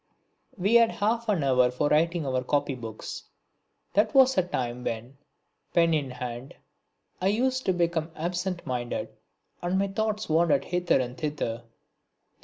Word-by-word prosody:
We 200 +4 +1
had 230 -1 +6
half 225 +2 0
an 185 -8 +2
hour 125 -2 +4
for 125 +4 0
writing 165 +1 +2
our 130 -1 0
copybooks; 125 -5 -3 0.7
that 210 +7 +2
was 265 -1 +6
a 185 - +4
time 125 -8 -3
when, 120 +5 -5 0.6
pen 170 -1 +4
in 145 -4 0
hand, 125 +1 -6 0.7
I 185 - +2
used 255 +5 +1
to 185 - +4
become 170 -2 0
absent 175 +2 -3
minded 120 -1 -3 0.5
and 175 +2 0
my 195 0 +1
thoughts 215 +1 -2
wandered 160 -3 +3
hither 180 -3 +1
and 125 -1 -3
thither. 145 -7 -3
165 Hz, 145 wpm, -27 LUFS, 130-195 Hz, 0.7 s, had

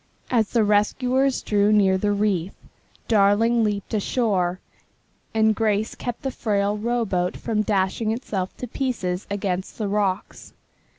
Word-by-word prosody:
As 225 -4 +2
the 230 -2 +2
rescuers 250 +6 +1
drew 205 0 +2
near 200 -3 +4
the 205 +2 0
reef, 200 -3 0 0.5
Darling 225 +2 +3
leaped 205 0 -2
ashore, 195 -5 0 0.7
and 220 0 +3
Grace 215 0 0
kept 245 +1 -6
the 270 - -1
frail 205 -3 0
rowboat 210 -5 -1
from 220 -2 -1
dashing 205 +1 0
itself 210 -6 -4
to 250 - -5
pieces 215 -8 -3
against 190 -2 -3
the 215 - -2
rocks. 200 -1 -2
210 Hz, 130 wpm, -23 LUFS, 195-230 Hz, 0.7 s, near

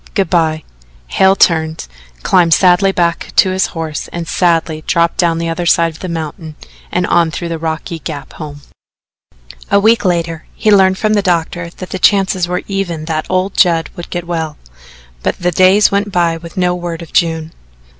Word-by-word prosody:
Good 195 -4 0
by." 160 -3 +1 0.5
Hale 190 - +4
turned, 160 -3 +1 0.4
climbed 170 -3 +4
sadly 190 +1 +4
back 170 -3 -1
to 185 - +4
his 190 +1 +1
horse 160 -2 -4
and 170 -1 -6
sadly 165 -3 0
dropped 170 0 +1
down 170 -2 +2
the 165 0 -2
other 165 +1 -2
side 170 0 +3
of 160 - -15
the 185 - -6
mountain 160 -1 -6 0.4
and 180 0 0
on 170 -2 +2
through 170 +2 -5
the 165 -1 -4
rocky 160 +1 -4
gap 150 -3 -7
home. 145 -2 -9 1.1
A 200 - +4
week 225 +3 +3
later 170 -3 -1
he 215 - +1
learned 190 -2 +4
from 215 +1 0
the 205 - +2
doctor 170 -2 -1
that 185 - -8
the 190 - -4
chances 190 -2 +2
were 180 +1 -2
even 180 -6 -3
that 155 -1 -3
old 185 +1 -1
Judd 165 -4 +2
would 175 - -8
get 175 -1 -4
well, 160 -3 -3 0.6
but - - -1
the 180 0 0
days 185 +4 +4
went 200 +1 0
by 170 -2 +1
with 170 +3 -11
no 180 -1 +1
word 175 -1 -5
of 165 - -14
June. 160 -1 0
170 Hz, 185 wpm, -15 LUFS, 165-185 Hz, 1.1 s, Hale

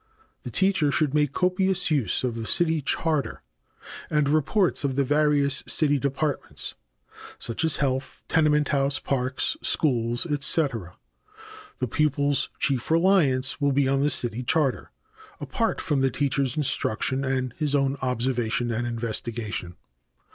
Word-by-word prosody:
The - - -7
teacher 190 -7 +2
should 145 -1 +1
make 150 -2 +2
copious 185 +1 +1
use 130 -10 +1
of 125 -3 -1
the 115 -1 -4
city 165 -2 +2
charter 150 -3 -1 0.7
and 150 -2 +1
reports 155 +5 +1
of 135 -2 -1
the 140 - +2
various 145 0 +2
city 145 -2 +3
departments, 140 +2 -3 0.6
such 115 - -2
as 160 -2 +2
health, 130 -2 -2
tenement 150 -2 +2
house, 140 -1 +1
parks, 130 -1 -1
schools, 120 -4 0
etc. 140 - 0 0.8
The 125 - -2
pupil's 145 +1 +1
chief 135 -4 -1
reliance 160 -7 +2
will 140 -1 +2
be 140 0 +2
on 135 0 +1
the 145 - +2
city 120 -4 0
charter 135 0 0 0.5
apart - - -2
from 140 -3 0
the 135 - +3
teacher's 140 0 0
instruction 130 -2 0
and 130 -2 -1
his 150 -2 +1
own 135 -1 +1
observation 120 -2 -1
and 120 +1 -2
investigation. 115 -5 -4
140 Hz, 135 wpm, -25 LUFS, 125-150 Hz, 0.8 s, city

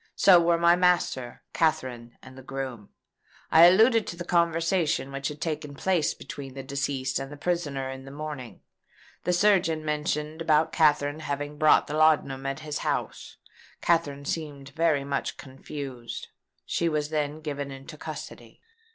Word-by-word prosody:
So 185 -3 +7
were 170 0 +3
my 170 +1 +5
master, 175 -9 +1
Katherine, 125 -7 -1
and 130 0 -13
the 130 - -11
groom. 130 -5 -6 0.6
I 165 +1 +9
alluded 220 +5 +5
to - - -5
the 175 0 -7
conversation 165 -4 +1
which 135 0 -3
had 150 0 -6
taken 150 -3 -4
place 175 0 +1
between 135 -2 -9
the 135 - -6
deceased 135 -1 -2
and 135 +1 -6
the 145 - -9
prisoner 145 -5 -2
in 130 0 -9
the - - -9
morning. 145 -4 -7 0.6
The 180 - +2
surgeon 175 -5 +3
mentioned 150 +1 -2
about 155 -1 +2
Katherine 150 -2 +3
having 145 0 -4
bought 155 0 +5
the 145 - -6
laudanum 150 -4 +2
at 135 +2 -3
his 150 -1 -4
house. - - -3 0.4
Katherine 145 -5 +1
seemed 145 -3 -4
very 155 -1 +1
much 140 0 -3
confused. 135 -2 -8 0.4
She 170 - 0
was 150 -1 -1
then 150 -1 -2
given 145 -2 -4
into 135 +4 -9
custody." - - -9
150 Hz, 155 wpm, -27 LUFS, 135-165 Hz, 0.6 s, I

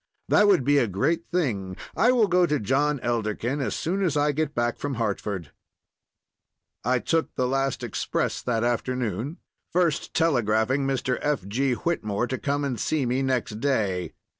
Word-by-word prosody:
That 210 - +5
would 190 -9 +4
be 145 +2 +4
a 120 - +2
great 150 - 0
thing; 100 - -1 0.2
I 235 +5 +4
will 235 -4 +4
go 180 -1 +3
to 150 -2 +1
John 140 +6 +1
Elderkin 120 +3 -1
as 130 - -1
soon 190 +5 -1
as 160 -5 +1
I 145 +1 +3
get 150 0 -2
back 120 0 0
from 145 -2 -3
Hartford." 100 -6 -3 1.3
I 125 +3 +2
took 165 +6 -1
the 125 - +1
last 135 0 -1
express - - -2
that 115 -2 0
afternoon, 120 - -1 0.3
first 170 -4 0
telegraphing 130 -3 +2
Mr. 130 -2 0
F. 145 -10 -1
G. 130 +5 +1
Whitmore 115 -6 -1
to 130 +1 -3
come 145 0 -1
and 125 -5 -2
see 150 +2 0
me 125 +2 0
next 125 -5 -1
day. 105 -10 0
130 Hz, 165 wpm, -25 LUFS, 115-150 Hz, 1.3 s, That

